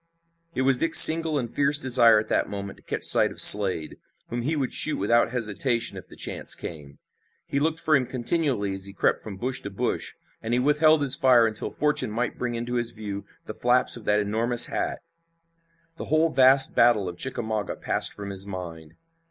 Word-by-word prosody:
It 130 - -1
was 130 -1 +2
Dick's 165 - +5
single 160 -1 +6
and 125 -4 -3
fierce 140 +4 0
desire 120 -5 +4
at 105 - -3
that - - -2
moment 100 -1 -8
to - - -22
catch - - -6
sight - - +3
of - - -11
Slade, 95 -6 +5 0.3
whom 120 0 -5
he 150 +7 -2
would 135 -4 -4
shoot 155 - 0
without 115 +5 +1
hesitation 120 0 -2
if - - -10
the - - -16
chance - - -3
came. 75 -4 -11 0.5
He 140 - -3
looked 160 +2 -2
for 155 -1 +2
him 130 -3 -1
continually 125 - -2
as 95 0 -6
he 100 - -10
crept 95 - -1
from 100 -3 -10
bush 130 +5 -4
to 100 - -8
bush, 95 - -4 0.3
and 115 +2 -3
he - - 0
withheld 150 +3 +2
his 135 -1 +5
fire 125 -3 +3
until 110 -1 -3
fortune 150 -6 -1
might 115 +3 -5
bring 120 -1 -4
into 120 +1 -4
his 120 -1 +2
view 100 -2 -8 0.2
the - - -8
flaps 125 +3 0
of 120 - -12
that 105 0 +1
enormous 115 +4 +1
hat. - - -5 1.0
The - - -7
whole 155 +1 0
vast 135 +1 +4
battle 115 -5 +2
of 90 - -7
Chickamauga 110 -3 -4
passed - - -2
from 100 -1 -8
his 95 0 -6
mind. 85 -4 -10
120 Hz, 200 wpm, -23 LUFS, 105-135 Hz, 1.0 s, single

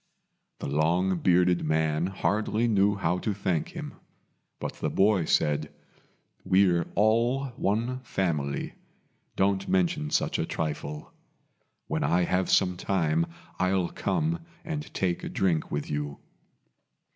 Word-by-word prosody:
The - - -5
long 85 +6 +1
bearded 90 0 +3
man 80 +1 +1
hardly 105 +4 0
knew 100 -2 +3
how 90 -2 0
to 105 +1 -2
thank 90 -5 -1
him; - - -6 0.7
but - - -4
the - - -1
boy 95 -3 +3
said, 75 -1 +1 0.7
"We're 90 -3 +3
all 120 +6 +2
one 120 +4 0
family. 80 - -2 0.6
Don't 95 0 +1
mention 85 -5 +1
such - - 0
a - - 0
trifle. 75 -1 -4 0.7
When - - -1
I 85 +5 +2
have 90 +1 0 0.3
time 85 -4 +1 0.3
I'll 90 -1 +1
come 165 +1 -1 0.3
and 155 -2 -4
take 90 -2 -1
a - - -4
drink 85 -5 0
with 75 0 -3
you." 75 -1 -3
90 Hz, 120 wpm, -27 LUFS, 80-100 Hz, 0.7 s, bearded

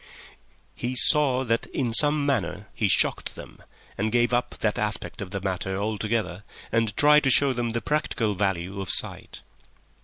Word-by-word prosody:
He 125 +1 -4
saw 130 -1 +5
that 115 -2 -1
in 120 -4 -3
some 145 +3 +3
manner 105 -7 -2
he 105 - 0
shocked - - 0
them, - - -12 0.4
and 110 +2 -1
gave 120 +1 +1
up 120 +1 -1
that 105 -2 -1
aspect 105 0 -3
of 95 - -6
the 100 +1 -4
matter 95 0 -3
altogether, 105 -2 -3 0.3
and 115 -3 -1
tried 150 +1 +5
to - - +3
show 135 +1 +4
them 120 -1 -2
the 115 - -2
practical 125 -5 -1
value 95 0 -2
of 95 - -6
sight. - - -2
115 Hz, 165 wpm, -25 LUFS, 100-130 Hz, 0.4 s, saw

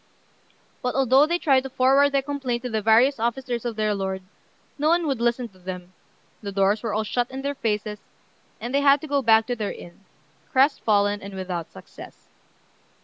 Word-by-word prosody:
But 250 - -2
although 270 +2 +4
they 345 +2 +1
tried 275 -6 +3
to 270 - -7
forward 270 +2 +4
their 275 -1 0
complaint 265 -4 -3
to 250 - -4
the 220 -1 -1
various 230 +5 +4
officers 240 +1 -2
of 235 -2 -3
their 215 -1 0
lord, 190 -1 -3 0.6
no 300 +2 +2
one 340 0 +2
would 270 -6 -2
listen 240 +1 0
to 190 -2 -23
them; 180 0 -8 0.5
the 200 - -5
doors 200 +2 +1
were 225 - -3
all 215 +1 0
shut 240 +3 -1
in 265 +1 -7
their 280 0 -1
faces, 210 -4 -3 0.6
and 240 +3 -5
they 280 - +2
had 280 0 +5
to 310 - -7
go 280 -1 +1
back 225 -2 +4
to 245 - -2
their 215 -3 -3
inn, 175 +3 -12 0.5
crestfallen 210 -7 +2
and 195 0 -9
without 180 -3 -5
success. 95 - -14
235 Hz, 195 wpm, -24 LUFS, 205-270 Hz, 0.6 s, had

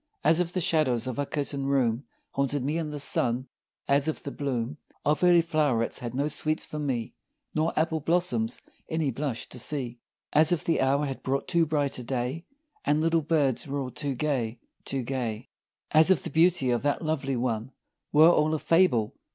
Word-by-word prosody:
As 160 +3 +5
if 175 -1 0
the 185 - -1
shadows 130 -8 +2
of 130 +1 -4
a 145 - -1
curtained 140 -2 -2
room 130 -2 +1 0.3
Haunted 140 -1 -1
me 155 +4 0
in 160 -2 -3
the 150 -1 -5
sun 130 -2 +1 0.4
as 140 +1 +3
if 155 - -2
the 140 - -5
bloom 135 -1 -3 0.3
Of 150 +4 +1
early 175 -1 +6
flow'rets 150 -8 +1
had 120 0 -6
no 140 +2 +1
sweets 155 +1 -1
for 150 - -6
me, 130 -6 -2 0.4
Nor 160 +2 +1
apple 160 0 +1
blossoms 180 - 0 0.3
any 160 -4 0
blush 130 -2 -3
to 125 - -8
see 125 -2 -1 0.3
As 155 +2 +5
if 175 -1 +1
the 165 - +1
hour 140 +2 +2
had 135 -2 -5
brought 135 +1 -2
too 170 -2 +2
bright 145 -4 -1
a - - -6
day 130 +6 -3 0.4
And 150 +1 +2
little 165 +1 +2
birds 145 -5 +1
were 140 +1 -2
all 130 -2 -4
too 140 0 -3
gay! 125 -5 -1 0.3
too 135 -2 -2
gay! 120 -2 -4 0.4
As 155 +3 +6
if 185 -8 +3
the - - -5
beauty 160 -5 +3
of 120 - +1
that 145 +3 0
Lovely 135 -4 -1
One 120 0 -2 0.4
Were 155 +3 +7
all 155 -1 +2
a - - -2
fable. 165 - +3
145 Hz, 195 wpm, -27 LUFS, 130-155 Hz, 0.4 s, Were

